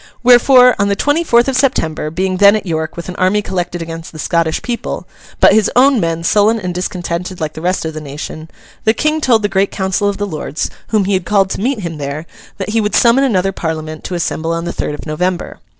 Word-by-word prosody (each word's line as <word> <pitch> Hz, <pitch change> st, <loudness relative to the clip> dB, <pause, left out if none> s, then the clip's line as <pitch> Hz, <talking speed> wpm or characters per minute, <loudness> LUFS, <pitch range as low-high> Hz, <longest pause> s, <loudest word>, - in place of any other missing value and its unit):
Wherefore, 250 Hz, +1 st, +6 dB
on 200 Hz, -, +2 dB
the 200 Hz, -, +1 dB
twenty 290 Hz, +9 st, +1 dB
fourth 240 Hz, -5 st, +3 dB
of 270 Hz, -, 0 dB
September, 165 Hz, -, 0 dB
being 185 Hz, +3 st, -1 dB
then 200 Hz, +2 st, +6 dB
at 215 Hz, -, -3 dB
York 160 Hz, -1 st, -3 dB
with 170 Hz, -, -6 dB
an 180 Hz, -, -6 dB
army 195 Hz, +3 st, +2 dB
collected 175 Hz, -2 st, -3 dB
against 165 Hz, 0 st, -8 dB
the 155 Hz, -, -11 dB
Scottish 160 Hz, +1 st, 0 dB
people, 240 Hz, -1 st, -4 dB, 0.3 s
but -, -, +6 dB
his 215 Hz, -1 st, +3 dB
own 265 Hz, 0 st, +5 dB
men 165 Hz, -2 st, -1 dB
sullen 215 Hz, +5 st, +3 dB
and 180 Hz, -3 st, -4 dB
discontented 180 Hz, 0 st, -4 dB
like 155 Hz, -2 st, -3 dB
the 155 Hz, -, -8 dB
rest 180 Hz, 0 st, -1 dB
of 160 Hz, -, -4 dB
the 155 Hz, -, -6 dB
nation, 150 Hz, +2 st, -8 dB, 0.3 s
the 220 Hz, +1 st, +2 dB
King 305 Hz, +5 st, 0 dB
told 230 Hz, -6 st, +3 dB
the -, -, +3 dB
great 195 Hz, 0 st, +1 dB
council 190 Hz, +1 st, -1 dB
of 200 Hz, -, -3 dB
the 205 Hz, -, -2 dB
Lords, 155 Hz, -4 st, -4 dB, 0.2 s
whom 215 Hz, -3 st, +1 dB
he 200 Hz, -, 0 dB
had 185 Hz, -1 st, 0 dB
called 195 Hz, 0 st, +2 dB
to -, -, -3 dB
meet 250 Hz, -1 st, -1 dB
him 165 Hz, -4 st, -5 dB
there, 145 Hz, +3 st, -4 dB, 0.3 s
that 195 Hz, -1 st, -4 dB
he 225 Hz, +1 st, +1 dB
would 210 Hz, -1 st, -1 dB
summon 240 Hz, +3 st, +4 dB
another 195 Hz, -7 st, +1 dB
Parliament 155 Hz, -3 st, -5 dB
to 180 Hz, -, -4 dB
assemble 165 Hz, -1 st, -2 dB
on 165 Hz, 0 st, -2 dB
the 175 Hz, -, -3 dB
third 150 Hz, -, -3 dB
of -, -, -10 dB
November. 175 Hz, +3 st, -3 dB
185 Hz, 235 wpm, -15 LUFS, 165-215 Hz, 0.3 s, Wherefore